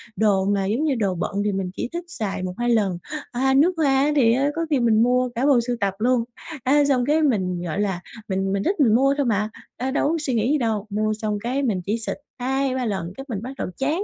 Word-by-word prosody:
đồ 200 -3 +2
mà 200 -1 +1
giống 225 +9 0
như 300 -4 +1
đồ 200 -6 0
bận 170 - -2
thì 210 - +1
mình 190 -2 -3
chỉ - - -3
thích 345 0 -3
xài 215 - -4
1-2 185 +7 -2
lần, 205 -6 +2 0.3
à, 265 +2 +1
nước 310 +7 +4
hoa 310 -3 +2 0.2
á, 300 - +2
thì 230 -5 +5
á 275 +4 +2
có 330 0 -1
khi 290 -4 +2
mình 225 -2 +4
mua 250 +1 +2
cả 245 +4 0
bộ 275 -4 +5
sưu 245 - 0
tập 200 -3 0
luôn, 245 +1 +2 0.4
á, 285 +3 +4
xong 260 -3 +2
cái 300 +3 +2
mình, 190 - +1
gọi 170 +4 -3
là, 195 -4 0 0.3
mình 195 0 0
mình 200 - 0
thích 390 - +1
mình 230 -7 +5
mua 275 +3 +4
thôi 285 - +1
mà, 210 -2 +1 0.3
ơ, 260 +2 -2
đâu 285 - +1
có 330 - +1
suy 295 -4 -2
nghĩ 230 +3 +1
gì 300 - +3
đâu. 220 -5 -1
Mua 215 +1 0
xong 215 -1 -2
cái 260 +4 -1
mình 205 -8 0
chỉ 210 +3 0
xịt 225 - -4 0.2
2-3 260 0 0
lần 185 -5 -3
cái 270 - -7
mình 205 -5 -3
bắt 250 +3 -6
đầu - - -3
chán, 300 +8 0
235 Hz, 260 wpm, -23 LUFS, 205-270 Hz, 0.4 s, thì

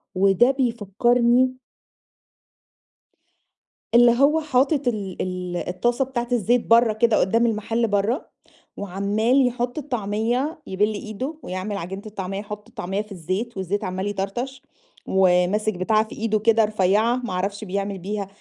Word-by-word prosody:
وده 195 +6 +4
بيفكّرني 240 +1 +2 2.4
اللي 240 0 +7
هو 300 +3 +4
حاطط 285 -1 +1
ال 200 -6 -2
ال 180 -1 -3
الطاسة 240 +10 -1
بتاعة 245 -2 -3
الزيت 240 +1 +2
برّا 230 -1 +5
كده 220 0 +2
قدّام 230 +5 +2
المحل 225 +1 0
برّا، 205 +6 0 0.5
وعَمّال 205 +7 +1
يحط 245 +1 -3
الطعمية، 245 - -2
يِبِل 210 +3 0
إيده 220 +8 -5
ويعمل 185 +3 -4
عجينة 195 +2 -6
الطعمية، 195 -2 -5
يحط 210 +1 -8
الطعمية 205 -4 -3
في 210 0 -13
الزيت، 195 +6 -4
والزيت 190 +2 -2
عَمّال 185 +2 -3
يطرطش، 205 +7 -4 0.5
وماسك 190 +3 +2
بتاعة 215 +4 +2
في - - -10
إيده 215 -1 0
كده 225 +1 +4
رفيّعة 210 +3 +2
ما 245 -6 -4
أعرفش 200 +3 -2
بيعمل 200 0 -3
بيها 200 +2 -4
215 Hz, 130 wpm, -23 LUFS, 195-240 Hz, 2.4 s, اللي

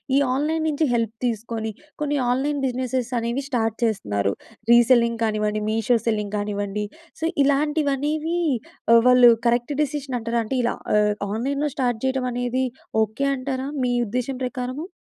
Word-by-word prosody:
ఈ - - +5 0.2
ఆన్‌లైన్ 310 +4 0
నుంచి 310 +1 +1
హెల్ప్ 230 -2 0
తీసుకొని, 225 -1 -2 0.3
కొన్ని 295 -1 0
ఆన్‌లైన్ 280 +4 0
బిజినెస్సెస్ 255 -1 -2
అనేవి 235 +4 -2
స్టార్ట్ 225 -4 0
చేస్తున్నారు. 105 - 0 0.4
రీసెల్లింగ్ 235 -1 +5
కానివ్వండి, 215 -1 0
మీషో 225 +2 +2
సెల్లింగ్ 210 -2 -1
కానివ్వండి, 205 0 -2 0.4
సో - - 0 0.2
ఇలాంటివనేవి 295 +2 +1 0.6
ఆహ్, 230 - +8
వాళ్ళు 250 -1 +8 0.2
కరెక్ట్ 240 +4 +1
డెసిషన్ 275 -3 -3
అంటారా? 230 +1 -1
అంటే, 260 +4 -2
ఇలా 240 - 0 0.2
ఆహ్, 210 0 +3 0.2
ఆన్‌లైన్‌లో 275 +7 -1
స్టార్ట్ 245 -4 0
చేయడం 260 -1 0
అనేది 245 +1 0 0.4
ఓకే 220 +6 -2
అంటారా, 260 0 -3
మీ 245 -1 +1
ఉద్దేశ్యం 250 +4 -3
ప్రకారము? 255 +5 -4
245 Hz, 140 wpm, -23 LUFS, 225-275 Hz, 0.6 s, ఆహ్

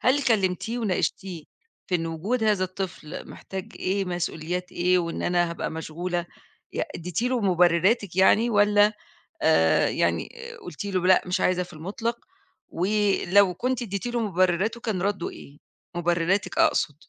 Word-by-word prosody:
هل 275 +3 +3
كلّمتيه 220 0 +1
وناقشتيه 190 -5 -2 0.4
في 185 - -2
إن 165 -2 0
وجود 200 +9 -1
هذا 210 -3 +2
الطفل 185 -4 -6
محتاج 190 -1 -8
إيه 195 +2 0
مسؤوليات 175 0 -3
إيه 180 +1 +2
وإن 170 -1 -3
أنا 175 -1 +1
هابقى 170 - -4
مشغولة 170 +2 -3 0.5
ي - - -1
اديتِ 175 +4 -3
له 250 -1 +1
مُبرِّراتِك 180 +1 +3
يعني، 215 +5 +5
والّا 205 0 +4 0.5
آآ، - - +4
يعني - - 0 0.3
قلتِ 365 - -7
له 185 -3 -1
لأ 185 - +6
مش 180 0 -1
عايزة 180 0 +2
في 175 - -14
المطلق 210 +9 -3 0.5
ولو 200 0 +2
كنتِ 250 +6 -1
اديتِ 200 0 -3
له 240 0 -1
مُبرِّراته 190 +2 +1
كان 210 -6 -2
ردُه 200 -2 -1
إيه؟ 140 - -13 0.4
مُبرِّراتِك 175 +3 0
أقصد. 150 - +2
185 Hz, 145 wpm, -25 LUFS, 175-210 Hz, 0.5 s, لأ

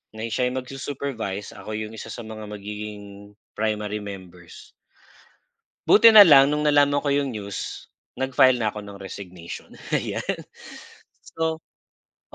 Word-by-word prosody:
na 110 - -6
siya 125 +3 +1
yung 130 +1 -3
magsu-supervise, 130 -6 -5
ako 110 - -7
yung 110 0 -5
isa - - -8
sa 120 - -7
mga 110 -1 -8
magiging 105 -1 -8 0.2
primary 105 -1 -2
members. 95 -4 -11 1.2
Buti 230 +2 +8
na 210 - +12
lang 140 -4 +8
nung 150 - -1
nalaman 145 -1 +3
ko 145 - 0
yung 140 -3 0
news, 100 -2 -6 0.3
nag-file 130 -1 +4
na 110 -2 0
ako 105 0 -8
ng 100 -1 -10
resignation, 90 -3 -9 0.2
ayan. - - -1 1.1
So, 160 0 -1 0.7
p - - -15
110 Hz, 135 wpm, -24 LUFS, 100-135 Hz, 1.2 s, na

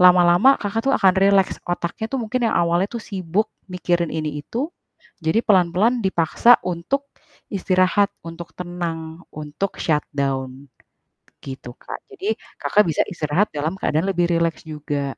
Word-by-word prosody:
lama-lama 180 +7 +6
Kakak 205 +2 -2
tuh 270 - +4
akan 190 -3 +5
rileks. 195 0 +3
Otaknya 175 +5 -2
tuh 270 - -2
mungkin 230 +3 -2
yang - - 0
awalnya 175 +3 +2
tuh 235 -3 -6
sibuk 190 +1 -1 0.2
mikirin 175 -2 0
ini 155 -2 -3
itu. 245 - -3 0.5
Jadi 160 +6 +1
pelan-pelan 195 +5 +3
dipaksa 190 +5 +4
untuk 185 +12 -2 0.4
istirahat, 185 +1 +2 0.2
untuk 165 0 -9
tenang, 170 -2 -5
untuk 155 +6 -4
shutdown. 140 -3 -2 0.7
Gitu, 130 -2 -8
Kak. - - -7
Jadi 405 +2 -2 0.2
Kakak 210 - +4
bisa 155 - +2
istirahat 170 +3 0
dalam 155 +4 -2
keadaan 155 +4 0
lebih 175 -2 +1
rileks 165 -1 0
juga. 150 -2 -3
175 Hz, 140 wpm, -22 LUFS, 160-200 Hz, 0.7 s, lama-lama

